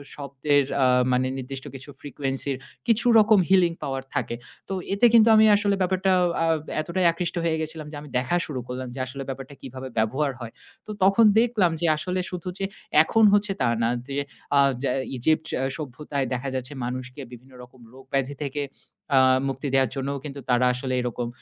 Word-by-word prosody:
শব্দের 140 0 0 0.2
আ - - +5 0.3
মানে 130 +1 +1
নির্দিষ্ট 135 +1 -7
কিছু 135 +2 -10
frequency 135 0 -3
র, - - -9 0.3
কিছু 230 +1 +2
রকম 215 -1 +5
healing 180 -3 +4
power 135 -1 -3
থাকে। 120 - -1 0.3
তো - - -2 0.2
এতে 200 +5 +3
কিন্তু 230 -1 +7
আমি 220 0 +7
আসলে 205 -1 +1
ব্যাপারটা 185 +1 +1 0.3
আ - - +2 0.4
এতটাই 175 +3 -1
আকৃষ্ট 170 +1 -4
হয়ে 165 -1 +1
গেছিলাম 155 -1 -6
যে, - - -8
আমি 150 - -11
দেখা 130 +7 -1
শুরু 140 -4 -5
করলাম 125 +1 -5
যে - - -6
আসলে 135 +2 -6
ব্যাপারটা 135 +1 -7
কিভাবে 130 0 -8
ব্যবহার 130 +7 +1
হয়। 120 -2 -7 0.4
তো - - -5
তখন 195 +4 +5
দেখলাম 225 -7 +2
যে, - - +1
আসলে 180 +4 -5 0.2
শুধু 180 0 -5
যে 195 - 0 0.4
এখন 225 +7 +2
হচ্ছে 205 0 +2
তা 125 - +3 0.2
না, 115 - +2 0.2
যে 140 0 -4 0.4
আ - - +6 0.2
যে 140 - 0 0.3
Egypt 155 +5 +1 0.3
সভ্যতায় 140 -1 -4
দেখা 125 +2 -3
যাচ্ছে, 130 +2 -4
মানুষকে 130 +2 -6
বিভিন্ন 125 +2 -14
রকম 125 +1 -17
রোগ 135 +1 -14
ব্যাধি 135 +1 0
থেকে 145 +1 -3 0.5
আ - - +6 0.3
মুক্তি 135 +1 -3
দেওয়ার 135 -2 +3
জন্যও 140 +1 -3
কিন্তু, 140 -1 -7
তারা 125 0 +3
আসলে 130 +1 -4
এরকম 120 0 -3
140 Hz, 185 wpm, -24 LUFS, 130-175 Hz, 0.5 s, কিন্তু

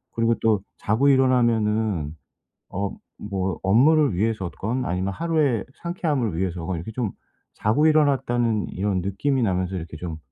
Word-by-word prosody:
그리고 115 0 +2
또 110 -3 +2 0.2
자고 120 +7 +2
일어나면은 110 - +2 0.5
어 100 +1 -3 0.3
뭐 95 -2 -2
업무를 140 - +4
위해서 105 -2 -1
건 125 +5 -3
아니면 95 +2 -1
하루의 150 - +1 0.2
상쾌함을 150 - -1
위해서 90 -3 -2
건 95 - -2
이렇게 85 +7 -6
좀 110 -4 -2 0.4
자고 115 +9 +1
일어났다는 125 - +2
이런 95 -1 -1
느낌이 125 +8 0
나면서 95 -2 0
이렇게 80 -3 -6
좀 80 -1 -5
110 Hz, 330 characters per minute, -24 LUFS, 95-130 Hz, 0.5 s, 업무를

